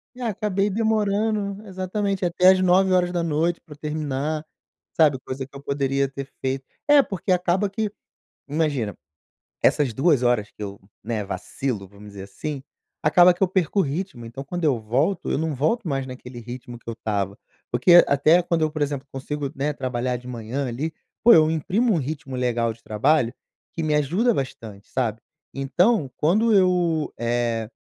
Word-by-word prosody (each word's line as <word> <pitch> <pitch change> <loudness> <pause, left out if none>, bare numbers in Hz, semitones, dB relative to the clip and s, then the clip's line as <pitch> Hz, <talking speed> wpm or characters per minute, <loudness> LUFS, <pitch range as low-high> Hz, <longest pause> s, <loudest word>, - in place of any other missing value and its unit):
e 255 - -11
acabei 205 -3 0
demorando, 210 -1 0
exatamente 190 +1 -2
até 180 +1 +5
às 190 - +5
21:00 175 -3 +2
pra 150 - -13
eu - - -17
terminar, 150 0 -3 0.5
sabe, 150 -5 +4
coisa 130 0 -4
que 135 - -20
eu 140 - -8
poderia 140 -1 0
ter 140 0 -7
feito 135 0 -2 0.2
É 290 -1 +8
porque 190 -1 -3
acaba 180 +2 +2
que, 210 +1 -2 0.6
imagina, 145 -8 -1 0.7
essas 140 -6 +3
2 135 0 +3
horas 120 -4 +2
que - - -15
eu, 100 -1 -7 0.2
né, 110 -3 -2
vacilo, 105 0 -4
vamos 100 +1 -14
dizer 100 -1 -9
assim, 135 +8 -6 0.4
acaba 175 +4 +6
que 175 - -19
eu - - +4
perco 190 +1 0
o - - +5
ritmo, 150 - -4
então, 120 +4 -7
quando 175 +5 -5
eu 140 -7 +2
volto, 135 - 0
eu - - +1
não 160 -1 -1
volto 160 - 0
mais 135 -2 -1
naquele 125 -1 -9
ritmo 120 +1 -8
que - - -35
eu - - -3
estava, 100 -3 -2 0.3
porque 170 +9 +7
até 155 +5 +4
quando 170 -1 0
eu, 155 - +1
por 155 -1 -5
exemplo, 140 -1 -2
consigo, 140 +1 -4
né, 145 +2 -1
trabalhar 125 -2 -2
de 125 +1 -12
manhã 125 +3 -4
ali, 140 +7 -3 0.3
pô, 235 - +9
eu 155 -1 +6
imprimo 205 - +1
um - - +2
ritmo 140 -2 -4
legal 120 -2 0
de 115 - -23
trabalho 120 +3 +2 0.4
que 165 - -3
me 150 -1 +1
ajuda 180 - +2
bastante, 110 - -6
sabe. 115 -4 -1 0.3
Então, 140 - +1
quando 215 +9 +3
eu, 180 -5 +2
eh 115 -1 -1
150 Hz, 170 wpm, -23 LUFS, 125-180 Hz, 0.7 s, pô